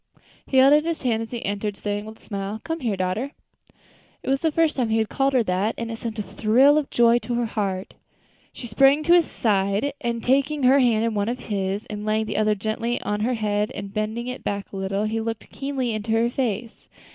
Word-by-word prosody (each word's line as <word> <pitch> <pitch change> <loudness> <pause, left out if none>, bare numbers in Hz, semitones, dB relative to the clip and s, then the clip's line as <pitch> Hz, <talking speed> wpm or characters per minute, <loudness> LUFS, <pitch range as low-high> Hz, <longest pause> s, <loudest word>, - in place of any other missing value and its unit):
He 265 - 0
held 270 +2 +7
out 300 0 +5
his 330 -2 -3
hand 230 -3 +1
as 225 - -5
she 240 0 -5
entered, 205 0 -2
saying 205 0 -3
with 220 0 -10
a - - -25
smile, 200 +1 -4
"Come 325 0 -3
here, 225 -8 -1
daughter." 190 - -2 0.9
It - - -4
was 270 - +1
the 320 - +1
first 320 0 +2
time 245 -4 0
he 220 - +2
had 220 -1 0
called 270 0 +1
her 250 -3 +4
that, 195 +3 0
and 230 0 -4
it 225 - -6
sent 230 -1 -5
a 210 - -2
thrill 245 +9 +4
of 290 - -5
joy 235 0 +4
to 240 +2 -4
her 240 0 0
heart. 200 -4 -3 0.6
She - - -9
sprang 275 +6 +4
to 340 - +4
his 345 -2 +4
side, 205 +5 0
and, 235 -1 -2
taking 275 +3 +1
her 265 +2 +6
hand 230 -3 +3
in 230 - 0
one 205 +1 0
of 245 - -2
his, 200 -2 -3
and 210 0 -6
laying 215 +1 0
the - - -3
other 215 0 +2
gently 220 +4 -2
on 210 0 -1
her 240 +4 0
head, 210 -1 0
and 200 -1 -7
bending 215 +2 -2
it 250 +1 -6
back 200 0 -3
a - - -5
little, 195 +1 -1
he 220 +1 -1
looked 225 -1 -5
keenly 270 -3 -2
into 215 +1 -2
her 230 +1 +2
face. 235 -3 -3
225 Hz, 240 wpm, -24 LUFS, 210-255 Hz, 0.9 s, held